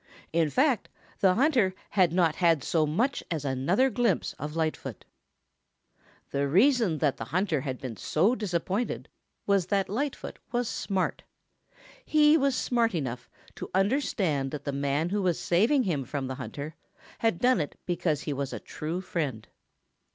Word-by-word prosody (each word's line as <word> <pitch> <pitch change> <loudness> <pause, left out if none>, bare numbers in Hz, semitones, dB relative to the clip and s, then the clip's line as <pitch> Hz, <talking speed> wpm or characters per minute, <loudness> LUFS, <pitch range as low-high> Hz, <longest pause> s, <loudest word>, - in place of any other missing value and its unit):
In 165 -2 +2
fact, 260 - +2 0.3
the 185 -2 +4
hunter 240 -8 +3 0.2
had 185 -5 +3
not 170 -3 +2
had 165 -6 +3
so 155 -2 +1
much 235 - 0
as 155 -4 -3
another 170 - +2
glimpse 230 -3 +1
of 150 +1 -5
Lightfoot. 160 -1 -3 1.3
The 140 0 0
reason 210 - +4
that 145 -3 +1
the 115 - -5
hunter 165 - 0
had 130 -2 -4
been 130 -5 -6
so 170 - +2
disappointed 200 +1 -2 0.4
was 200 -3 +2
that 195 -1 0
Lightfoot 270 +7 -3
was 240 0 0
smart. 190 -3 -2 0.8
He 300 0 +5
was 275 -4 +2
smart 235 -5 +1
enough 125 -5 -4 0.2
to - - -7
understand 190 - +1
that 150 +1 -6
the 140 - -2
man 140 +4 0
who 205 +2 0
was 180 -3 +1
saving 225 +11 +3
him 160 - -1
from 135 +2 -4
the 130 - -3
hunter 145 +4 -6 0.5
had 225 -6 +1
done 245 -2 +3
it 145 - -5
because 165 -4 0
he 150 - -3
was 140 0 -3
a - - -4
true 165 +4 -5
friend. 145 - -3
175 Hz, 160 wpm, -28 LUFS, 145-220 Hz, 1.3 s, He